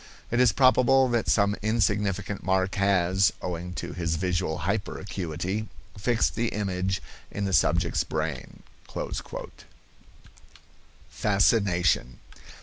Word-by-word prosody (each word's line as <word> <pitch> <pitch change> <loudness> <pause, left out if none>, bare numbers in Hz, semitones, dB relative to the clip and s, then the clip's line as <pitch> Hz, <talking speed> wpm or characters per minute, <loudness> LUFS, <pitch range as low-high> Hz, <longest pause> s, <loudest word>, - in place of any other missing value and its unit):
It 120 - +1
is 125 -3 +5
probable 130 +2 +4
that 120 -2 0
some 100 -1 +3
insignificant 105 -2 0
mark 95 0 +1
has, 95 -1 +3
owing 90 0 -5
to - - -5
his 85 -2 -1
visual 90 -2 -1
hyperacuity, 95 +1 -3 0.3
fixed 115 +3 +1
the 120 0 -1
image 95 -3 -2 0.3
in 105 - -3
the 95 - -2
subject's 85 -1 +2
brain." - - -4 2.5
FASCINATION. 95 - +2
100 Hz, 100 wpm, -26 LUFS, 90-105 Hz, 2.5 s, is